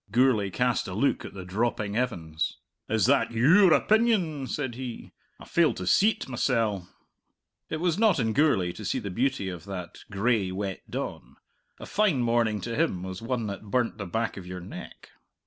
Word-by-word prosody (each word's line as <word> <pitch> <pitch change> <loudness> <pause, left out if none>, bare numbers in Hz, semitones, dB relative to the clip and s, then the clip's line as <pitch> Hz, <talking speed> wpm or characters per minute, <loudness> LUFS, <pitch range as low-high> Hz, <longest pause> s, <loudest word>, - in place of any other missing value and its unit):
Gourlay 120 -5 +3
cast 125 +5 0
a 90 - -5
look 130 +7 +1
at - - -9
the 95 -2 -7
dropping 105 +1 -1
heavens. 80 -10 -2 0.3
"Is 110 -3 +2
that 120 -3 +3
your 165 - +6
opinion?" 190 - +2
said 130 -1 -3
he. 125 -1 -7 0.3
"I - - -11
fail - - +2
to 90 - -5
see't 210 - +3
mysell." 115 -7 0 0.8
It 160 - -2
was 175 +1 +1
not 220 -3 +4
in 110 -2 +1
Gourlay 140 - +3
to 110 - -9
see 95 - -1
the 105 -6 -4
beauty 120 -2 0
of 90 -2 -6
that 90 -4 -7
gray, 100 -1 +1
wet 95 0 -5
dawn. - - -5 0.4
A - - -8
fine 190 -12 +2
morning 115 -3 +1
to 115 +3 -4
him 130 - 0
was 95 -1 -6
one 115 0 -2
that 100 0 -6
burnt 120 0 0
the 100 - -4
back 115 +5 -2
of 90 -2 -8
your 90 0 -6
neck. 90 - -10
115 Hz, 180 wpm, -27 LUFS, 95-130 Hz, 0.8 s, your